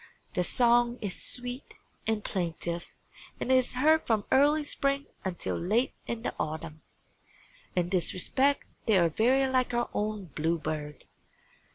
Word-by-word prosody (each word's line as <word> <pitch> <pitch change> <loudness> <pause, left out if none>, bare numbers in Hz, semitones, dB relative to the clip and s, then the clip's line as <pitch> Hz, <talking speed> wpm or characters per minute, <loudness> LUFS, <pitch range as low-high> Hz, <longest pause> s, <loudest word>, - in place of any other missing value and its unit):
Their 180 - +1
song 240 +3 +4
is 200 -4 -3
sweet 245 +1 -5 0.3
and 220 -2 0
plaintive 170 -1 -3 0.5
and 260 - -1
is 255 -1 +3
heard 310 +5 +4
from 220 -3 +1
early 295 +3 +4
spring 275 -1 -1 0.2
until 185 -2 -2
late 215 +9 +1
in 230 -1 -4
the - - -2
autumn. 155 0 -4 0.9
In 175 -1 +1
this 180 -3 +1
respect 275 +9 +2 0.2
they 215 -3 +5
are 170 -2 +4
very 255 - +3
like 255 -2 +1
our 240 0 0
own 210 -5 -3
bluebird. 155 -2 -2
220 Hz, 140 wpm, -29 LUFS, 175-255 Hz, 0.9 s, they